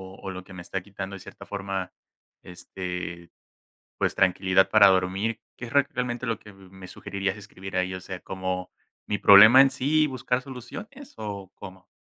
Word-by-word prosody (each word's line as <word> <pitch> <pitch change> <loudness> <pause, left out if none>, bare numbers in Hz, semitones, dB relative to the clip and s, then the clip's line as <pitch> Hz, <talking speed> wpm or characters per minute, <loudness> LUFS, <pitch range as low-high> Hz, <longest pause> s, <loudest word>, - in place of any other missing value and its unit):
o - - -17
o 95 - -6
lo 95 0 -8
que 95 - -14
me 90 -1 -9
está 95 +1 -4
quitando 100 0 -7
de 95 - -9
cierta - - -12
forma, 95 -2 -4 0.5
este, 90 -1 -7 0.7
pues - - 0
tranquilidad 95 0 +3
para 100 - +7
dormir, 95 +4 +1 0.2
¿qué - - -8
es 120 - -9
reac 140 -1 +3
realmente 125 0 -3
lo 115 -2 -1
que 105 - -14
me 95 -1 -17
me 95 0 -12
sugerirías?, 100 +1 -4
¿escribir 95 -2 -9
ahí, 90 0 0
o 95 - -6
sea, 95 0 -8
como 95 -1 -4 0.4
mi 105 - -1
problema 110 +6 +9
en 135 - +3
sí 145 +4 +1
y - - +2
buscar 130 -1 -2
soluciones?, 205 - -10
o, 100 -3 -6
¿cómo? 95 -1 -12
95 Hz, 190 wpm, -26 LUFS, 95-120 Hz, 0.7 s, problema